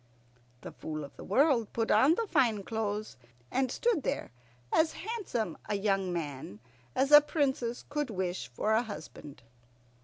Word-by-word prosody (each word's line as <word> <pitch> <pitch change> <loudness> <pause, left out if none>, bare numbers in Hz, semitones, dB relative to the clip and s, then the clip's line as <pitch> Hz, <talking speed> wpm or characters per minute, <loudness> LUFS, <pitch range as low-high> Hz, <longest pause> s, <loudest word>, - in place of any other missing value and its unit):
The - - -8
Fool 155 -1 -6
of 140 - -10
the - - -10
World 245 - +2
put 225 -1 0
on 265 +10 +5
the 460 - -1
fine 230 - +2
clothes, 215 - -3 0.3
and 260 -1 +1
stood 465 - +1
there - - -3 0.4
as 320 0 +3
handsome 360 - -3
a 210 - +1
young 195 -2 0
man 145 - -5 0.4
as 275 +2 +2
a 295 0 +11
princess 265 -6 -1
could 295 -2 -2
wish 185 -3 -3
for 210 - -1
a 220 - +4
husband. 155 - -9
225 Hz, 155 wpm, -30 LUFS, 190-285 Hz, 0.4 s, a